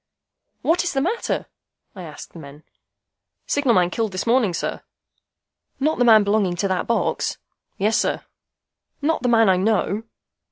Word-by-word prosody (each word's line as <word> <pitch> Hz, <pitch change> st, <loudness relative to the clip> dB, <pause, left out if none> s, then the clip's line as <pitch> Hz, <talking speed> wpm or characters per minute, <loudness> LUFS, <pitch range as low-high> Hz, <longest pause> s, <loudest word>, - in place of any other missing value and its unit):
"What 340 Hz, +3 st, +2 dB
is 355 Hz, -, -2 dB
the 270 Hz, -, +1 dB
matter?" 370 Hz, +12 st, -1 dB, 0.5 s
I 190 Hz, -, -8 dB
asked 155 Hz, -4 st, -10 dB
the 170 Hz, -, -10 dB
men. 145 Hz, 0 st, -12 dB, 0.8 s
"Signal 275 Hz, -5 st, +1 dB
man 180 Hz, -1 st, +3 dB
killed 220 Hz, -2 st, -2 dB
this 185 Hz, -, -3 dB
morning, 235 Hz, -4 st, +3 dB
sir." 170 Hz, -, -3 dB, 1.0 s
"Not 305 Hz, +2 st, 0 dB
the -, -, +4 dB
man 220 Hz, -3 st, +7 dB
belonging 200 Hz, -3 st, +1 dB
to 195 Hz, -, -1 dB
that 185 Hz, -1 st, -1 dB
box?" 235 Hz, -, -1 dB, 0.4 s
"Yes, 215 Hz, +3 st, +1 dB
sir." -, -, -1 dB, 0.8 s
"Not 320 Hz, +2 st, +1 dB
the 250 Hz, -, 0 dB
man 225 Hz, -2 st, +5 dB
I 185 Hz, -1 st, +4 dB
know?" 205 Hz, +1 st, 0 dB
220 Hz, 160 wpm, -22 LUFS, 185-250 Hz, 1.0 s, man